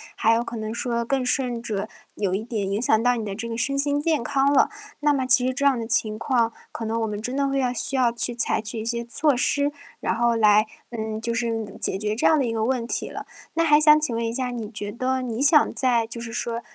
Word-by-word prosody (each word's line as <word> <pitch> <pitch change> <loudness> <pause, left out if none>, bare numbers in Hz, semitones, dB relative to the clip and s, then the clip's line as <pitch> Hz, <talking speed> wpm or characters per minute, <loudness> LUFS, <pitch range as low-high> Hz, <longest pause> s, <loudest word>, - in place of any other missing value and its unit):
还 225 - +3
有 230 +1 +1
可 235 - -7
能 215 0 -4
说， 235 -1 -2
更 265 +1 -1
甚 250 -2 0
者， 210 -4 -3 0.3
有 195 -3 -1
一 200 +3 -1
点 215 -5 -3
影 205 +3 -1
响 220 -2 +3
到 245 0 +3
你 225 - -4
的 200 - -4
这 230 +3 -5
个 230 - -4
身 275 +4 0
心 285 +1 +1
健 310 -5 0
康 280 0 +1
了。 - - +4 0.3
那 295 - +3
么 265 -2 0
其 255 0 +6
实 260 - 0
这 280 +1 -1
样 275 -2 +4
的 230 - -4
情 215 -2 +1
况， 235 -4 0 0.2
可 225 - -6
能 225 +1 -1
我 - - 0
们 210 0 -5
真 250 +4 -4
的 280 0 +1
会 275 0 0
要 250 -1 0
需 265 +3 -3
要 245 -2 +3
去 240 +1 -1
采 235 - +1
取 220 +1 -6
一 220 - -5
些 235 0 -1
措 280 +4 +1
施， 285 +3 +1 0.3
然 - - -1
后 235 0 +2
来 215 0 +5 0.3
嗯， 220 -2 -4
就 230 +1 -2
是 225 -3 -3
解 - - 0
决 210 +1 -2
这 - - -1
样 315 - +5
的 265 - +1
一 230 - -2
个 220 -1 -1
问 240 0 -1
题 - - -2
了。 - - -7 0.3
那 330 - +2
还 295 -1 +6
想 305 0 +7
请 280 -7 -1
问 230 - -1
一 230 - -2
下 255 0 -1
你 230 -3 -5
觉 210 -2 -5
得 255 +3 -1
你 240 -1 -4
想 295 +1 +5
在 235 -4 +1
就 235 0 -6
是 230 -1 -7
说 235 0 -3
235 Hz, 290 characters per minute, -24 LUFS, 225-260 Hz, 0.3 s, 想